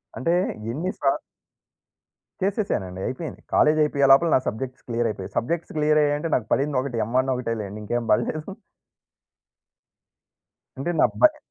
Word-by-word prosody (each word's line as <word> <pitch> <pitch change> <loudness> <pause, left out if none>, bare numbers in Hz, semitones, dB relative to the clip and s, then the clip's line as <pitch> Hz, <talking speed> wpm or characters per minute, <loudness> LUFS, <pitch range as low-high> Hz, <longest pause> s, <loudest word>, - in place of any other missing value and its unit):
అంటే 165 +6 0 0.4
ఎన్ని 170 +8 -2
సార్ 135 -1 +2 1.2
చేసేసానండి 190 - -1
అయిపోయింది. 155 +4 -5
కాలేజ్ 155 +1 +4
అయిపోయే 140 -2 +2
లోపల 165 +5 +6
నా - - +5
సబ్జెక్ట్స్ 130 +4 -4
క్లియర్ 120 -1 0
అయిపోయాయి. 95 -2 -8
సబ్జెక్ట్స్ 165 +8 -2
క్లియర్ 150 0 +3
అయ్యాయి 145 0 +2
అంటే 165 - -3
నాకు 110 -3 -1
పడింది 140 0 +1
ఒకటే 125 -4 -3
ఎమ్ 115 +4 -6
వన్ 130 +1 +1
ఒకటే 120 -2 -2
లెండి 105 +1 -7
ఇంకేం 120 +2 -2
బడలేదు. 150 +7 0 2.3
అంటే 140 +6 -2
నా - - +7 0.2
భయ్ 310 -1 +6
135 Hz, 145 wpm, -24 LUFS, 120-155 Hz, 2.3 s, నా